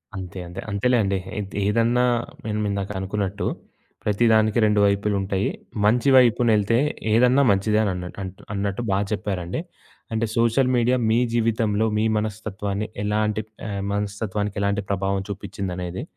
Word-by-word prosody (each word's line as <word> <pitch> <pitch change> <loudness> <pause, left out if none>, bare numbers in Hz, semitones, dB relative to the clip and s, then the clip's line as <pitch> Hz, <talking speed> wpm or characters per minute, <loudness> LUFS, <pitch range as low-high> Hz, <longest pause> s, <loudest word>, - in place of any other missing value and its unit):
అంతే 95 -1 -6
అంతే. 90 +2 -8
అంతేలేండి 100 -1 +2 0.2
ఎద్ 100 -2 -6
ఏదన్నా 115 +4 +2 0.4
నేను 105 -1 -1
ఇందాక 100 0 -2
అనుకున్నట్టు 100 +1 -2 0.6
ప్రతిదానికి 110 +1 +3
2 105 -1 +3
వైపులుటయ్యి. 100 -1 0 0.4
మంచి 120 +6 +3
వైపునెళ్తే 115 -3 +4 0.4
ఏదన్నా 125 +4 +5
మంచిదే 105 +2 +2
అని 100 - +1
అన్నట్టు 90 +1 -7
అన్నట్టు 100 +2 -2
బా 95 - +2
చెప్పారండి. 95 - -2 0.5
అంటే, 110 +1 +1
సోషల్ 115 +3 +3
మీడియా 125 +1 +3
మీ 110 - +3 0.2
జీవితంలో 110 -2 +1
మీ 105 - +2
మనస్తత్వాన్ని 105 -1 -3 0.2
ఎలాంటి 105 +1 0 0.3
ఆహ్, 100 -2 -3
మనస్తత్వానికి 105 0 -2
ఎలాంటి 100 0 0
ప్రభావం 95 0 0
చూపిచ్చిందనేది 90 -2 -5
105 Hz, 120 wpm, -23 LUFS, 100-110 Hz, 0.6 s, ఏదన్నా